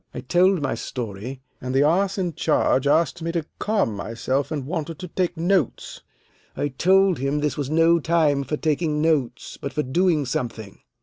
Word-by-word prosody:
I - - -4
told 180 -2 +2
my 135 - 0
story, 120 +2 -6 0.2
and 130 +1 -3
the 135 - +5
ass 190 +6 +2
in 180 -3 -1
charge 145 -4 +1
asked 155 +1 +2
me 165 +1 -2
to 165 -3 -1
calm 205 - 0
myself, 130 +6 -2
and 145 -4 -3
wanted 160 0 -4
to 180 - -7
take 180 0 -2
notes. 175 - -1 0.6
I 145 - -1
told 185 +5 +3
him 140 +2 0
this 150 0 -1
was 140 -2 -3
no 165 +2 +4
time 155 -3 +2
for 150 +3 -3
taking 155 0 0
notes, 145 -7 -1
but 140 - -5
for 150 - 0
doing 160 +2 +1
something. 115 -5 -4
150 Hz, 180 wpm, -23 LUFS, 135-170 Hz, 0.6 s, the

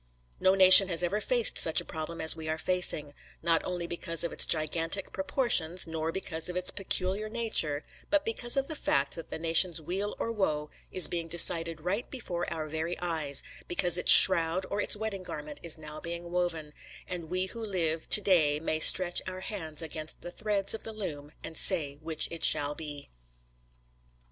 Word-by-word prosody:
No 190 +1 +1
nation 185 0 +9
has 170 -2 0
ever 200 +5 -3
faced 240 +1 +2
such 160 - +2
a - - -4
problem 160 +1 -8
as 160 0 +1
we 160 -1 -9
are 160 - -3
facing; 160 -4 +1 0.3
not 165 -1 0
only 175 -1 -6
because 170 -1 -1
of 170 - -5
its - - +2
gigantic 165 +4 -1
proportions, 190 - +1
nor 160 0 -5
because 165 -2 -5
of 180 - -7
its 180 0 -1
peculiar 195 +2 -1
nature, 215 -11 0 0.2
but 300 -1 -1
because 240 +3 -1
of 275 0 -1
the 315 - -7
fact 140 - -2
that 165 - -6
the - - -7
nation's 165 +1 +1
weal 190 +6 -5
or 230 - -5
woe 155 -9 -4 0.2
is 185 - +4
being 170 -1 -5
decided 165 -1 +2
right 195 +8 -5
before 175 -9 -6
our 155 -1 -6
very 160 +3 -5
eyes; 160 -5 -1 0.2
because 175 0 +1
its - - +6
shroud 180 0 +7
or 205 +1 -3
its - - +3
wedding 210 -2 -6
garment 150 -4 -8
is 170 -2 0
now 155 0 -11
being 170 +1 -8
woven, 165 -4 -4 0.3
and 175 -3 -8
we 185 +1 -2
who 230 +4 -9
live 165 -6 -4
to 210 - +10
day 155 -7 +1
may 155 0 -4
stretch 175 +2 +5
our 185 0 -8
hands 165 -7 -6
against 155 0 -4
the 175 - -10
threads 205 -1 -2
of 225 - -8
the 225 - -9
loom 150 -9 -8
and 160 - -9
say 160 -8 +4
which 160 -1 -2
it 165 -1 -8
shall 145 0 +3
be. 145 - -9
170 Hz, 190 wpm, -27 LUFS, 160-190 Hz, 0.3 s, to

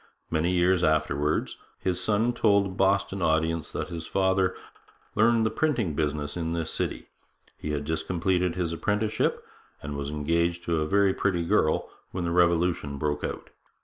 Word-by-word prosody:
Many 80 +2 +1
years 90 0 +3
afterwards 75 -1 +1 0.2
his 90 -1 -2
son 110 +5 +1
told 100 -4 +3
a - - -4
Boston 95 0 +1
audience 80 0 +1
that - - -4
his 85 -2 -6
father 95 -1 +1 0.6
'learned 115 +1 +3
the 110 - +1
printing 120 - 0
business 75 -1 -2
in 85 -1 -2
this 85 -1 -2
city. - - -3 0.5
He 75 - -6
had 75 -1 -2
just 80 +1 -2
completed 90 0 +1
his 85 -3 -1
apprenticeship, 105 +5 0 0.3
and 70 0 -6
was 70 0 -3
engaged 85 +3 0
to 85 -1 0
a 75 - -1
very 100 +2 +3
pretty 90 -4 0
girl, 85 -5 +2 0.2
when 90 - -4
the 85 - -1
Revolution 85 -4 +2
broke 75 +1 -2
out. - - -5
85 Hz, 165 wpm, -27 LUFS, 80-95 Hz, 0.6 s, years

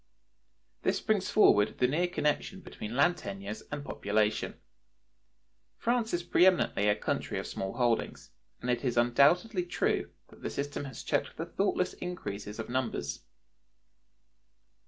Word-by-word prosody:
This - - +1
brings 205 -4 0
forward 105 - +5
the 125 - +3
near 165 +7 +1
connection 175 +3 -1
between 110 - -7
land 175 +6 +4
tenures 100 - -6
and 145 -1 -4
population. 105 -1 0 1.2
France 235 -1 0
is 175 0 -1
pre 175 +1 +5
eminently 175 - +2
a 105 - +4
country - - -2
of - - -3
small 95 0 -4
holdings, 120 -3 -1 0.3
and 125 - 0
it 120 -1 -1
is 125 -3 0
undoubtedly 155 - +4
true 175 - 0 0.2
that - - -17
the - - -3
system 145 0 -3
has 135 - -8
checked - - -1
the 165 - -3
thoughtless 185 +1 0
increase 175 - -5
of 110 - -5
numbers. 125 -1 -2
140 Hz, 140 wpm, -30 LUFS, 115-180 Hz, 1.2 s, forward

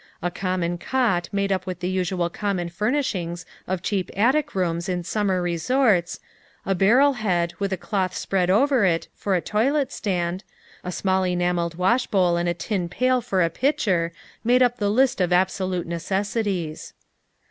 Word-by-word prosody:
A 175 - 0
common 180 -2 -2
cot 190 -8 0
made 200 0 0
up 185 0 -1
with 180 -2 -4
the 180 - -2
usual 185 -1 0
common 190 -4 -2
furnishings 185 -4 -2 0.2
of 185 -1 -2
cheap 195 -4 -1
attic 260 +7 +2
rooms 170 -2 -1
in 180 -1 -1
summer 190 -1 0
resorts, 180 +2 +1 0.5
a 195 - +1
barrel 240 +10 +4
head, 180 -7 0
with 200 -1 -1
a 190 - -1
cloth 185 -1 -2
spread 185 -2 0
over 260 +4 +3
it, 170 -3 +1
for 195 -2 -1
a 175 - +1
toilet 270 - +1
stand, 180 -2 -2 0.4
a 180 - -4
small 190 +1 0
enameled 175 -2 0
washbowl 185 -2 +2
and 175 0 0
a 175 - -1
tin 180 -2 -2
pail 255 +6 +1
for 195 -6 +1
a 165 - 0
pitcher, 185 - +1 0.3
made 250 +2 +4
up 245 0 +1
the 205 -3 0
list 250 0 +2
of 180 -1 +1
absolute 185 0 +1
necessities. 190 -1 -2
185 Hz, 165 wpm, -23 LUFS, 175-215 Hz, 0.5 s, barrel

